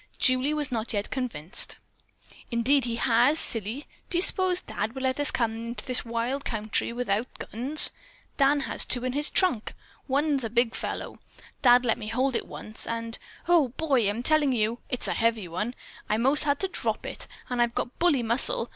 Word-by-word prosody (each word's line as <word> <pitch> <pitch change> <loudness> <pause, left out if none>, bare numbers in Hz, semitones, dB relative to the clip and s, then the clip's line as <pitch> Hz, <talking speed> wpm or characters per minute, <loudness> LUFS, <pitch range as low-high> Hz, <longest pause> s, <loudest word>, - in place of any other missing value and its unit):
Julie 255 +3 +2
was 295 -3 0
not 230 -1 -2
yet 205 -1 -3
convinced. 230 - -1 0.7
"Indeed 250 +3 +2
he 235 -1 -2
has, 245 +5 +3
silly. 230 +2 0 0.2
Do 345 - 0
you 350 - +3
s'pose 370 -2 +3
Dad 220 - -4
would 265 - -5
let 260 +1 0
us 290 - +2
come 230 -2 0
into 235 - -5
this 255 -2 +1
wild 235 +4 -3
country 220 0 -2
without 235 -1 -1
guns? 265 +8 +5 0.4
Dan 280 +1 +3
has - - +1
two 250 0 -2
in 255 - -2
his 295 +2 -1
trunk. 310 - +1 0.3
One's 280 0 +1
a 225 - -3
big 235 0 +1
fellow! - - -5 0.4
Dad 245 -1 +5
let 225 - +1
me 215 - -6
hold 255 +4 0
it - - -2
once, 215 +1 -1
and, 230 0 -3 0.3
Oh, 340 -5 +4
boy, 270 -10 +2
I'm 225 +4 -3
telling 300 -2 +3
you 230 0 -1
it's 250 - +1
a - - 0
heavy 225 -4 0
one. 210 +9 -4 0.3
I 210 - +1
most 270 +6 +3
had 285 -1 +1
to 385 - +1
drop - - -2
it, - - -3 0.2
and 245 -1 -1
I've 235 0 0
got 245 - -4
bully 325 -8 +2
muscle. 270 - +1
245 Hz, 190 wpm, -26 LUFS, 230-285 Hz, 0.7 s, guns